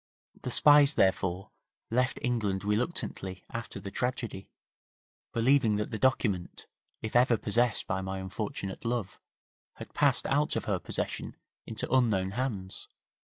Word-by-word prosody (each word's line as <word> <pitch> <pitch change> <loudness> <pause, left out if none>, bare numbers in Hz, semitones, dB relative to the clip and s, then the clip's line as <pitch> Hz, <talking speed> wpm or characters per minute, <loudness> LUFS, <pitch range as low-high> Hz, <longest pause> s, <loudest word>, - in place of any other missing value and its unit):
The - - -4
spies 145 +3 +6
therefore 95 -1 +1 0.4
left 125 +2 +1
England 105 -6 0
reluctantly 105 - -2
after 115 -1 -5
the 100 - -7
tragedy, 120 -6 -3 0.8
believing 115 -2 +3
that 105 0 -2
the 110 - -3
document, 105 -9 0 0.4
if 110 - -5
ever 120 -1 +5
possessed 115 +1 +1
by 95 - -1
my 95 0 -4
unfortunate 95 0 -5
love, 115 -4 -2 0.6
had - - -10
passed - - +2
out 145 +2 +2
of - - -2
her - - 0
possession - - -3 0.3
into 110 -1 -3
unknown 105 -7 +3
hands.' 105 -6 -3
110 Hz, 130 wpm, -30 LUFS, 95-125 Hz, 0.8 s, spies